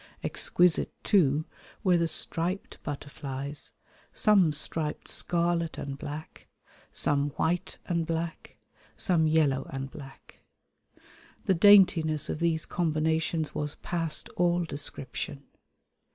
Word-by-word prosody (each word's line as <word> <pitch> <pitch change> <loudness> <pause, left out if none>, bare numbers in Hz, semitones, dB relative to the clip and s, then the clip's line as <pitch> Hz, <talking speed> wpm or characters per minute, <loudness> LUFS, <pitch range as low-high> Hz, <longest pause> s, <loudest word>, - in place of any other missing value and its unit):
Exquisite, 175 -2 +2
too, 155 -6 +3 0.4
were 185 -3 +4
the 170 -1 +2
striped 170 +4 -1
butterflies: 140 0 -6 0.4
some 195 -7 +4
striped 150 +1 -1
scarlet 170 -1 0
and 140 0 -6
black, 150 +2 -8 0.4
some 145 0 +1
white 175 +2 -1
and 170 -3 -1
black, 165 0 -4 0.4
some 165 -4 +2
yellow 150 -4 +2
and 135 0 -5
black. 135 -2 -13 1.1
The 190 - +3
daintiness 170 -5 +5
of - - -3
these 165 -2 0
combinations 160 -1 -1
was 150 0 -3
past 165 -3 -1
all 175 0 +1
description. 140 -1 -5
160 Hz, 105 wpm, -28 LUFS, 145-170 Hz, 1.1 s, daintiness